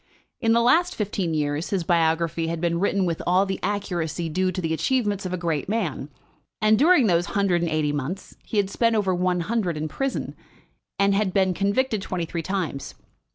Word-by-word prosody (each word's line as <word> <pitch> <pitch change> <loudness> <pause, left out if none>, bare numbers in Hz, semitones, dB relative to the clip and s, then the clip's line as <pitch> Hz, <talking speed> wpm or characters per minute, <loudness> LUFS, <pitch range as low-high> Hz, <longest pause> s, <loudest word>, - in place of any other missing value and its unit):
In 225 0 +2
the 235 - +4
last 345 +9 +3
fifteen 195 -6 -2
years 145 +1 -1
his 190 -4 0
biography 165 -1 +1
had 165 0 -2
been 170 0 0
written 200 0 +1
with 165 -2 -2
all 185 +2 +4
the 190 -1 -3
accuracy 175 -4 -2
due 185 +3 0
to 185 - -4
the 165 -3 -1
achievements 205 - 0
of - - -6
a - - -1
great 165 -3 -2
man; 180 -10 -2 0.5
and 215 0 +4
during 310 -3 +5
those 175 -3 +2
hundred 190 -4 +2
and 170 - 0
eighty 155 -2 0
months 145 +7 -5
he 220 - -4
had 200 -1 +1
spent 230 +2 +2
over 195 -3 +1
one 180 0 0
hundred 190 -4 -1
in 155 +1 -2
prison, 270 - -3 0.6
and 200 0 +3
had 195 -2 +1
been 190 -2 +3
convicted 205 +4 0
twenty 180 -3 -3
three 170 0 -4
times. 175 -6 -3
185 Hz, 200 wpm, -24 LUFS, 165-205 Hz, 0.6 s, during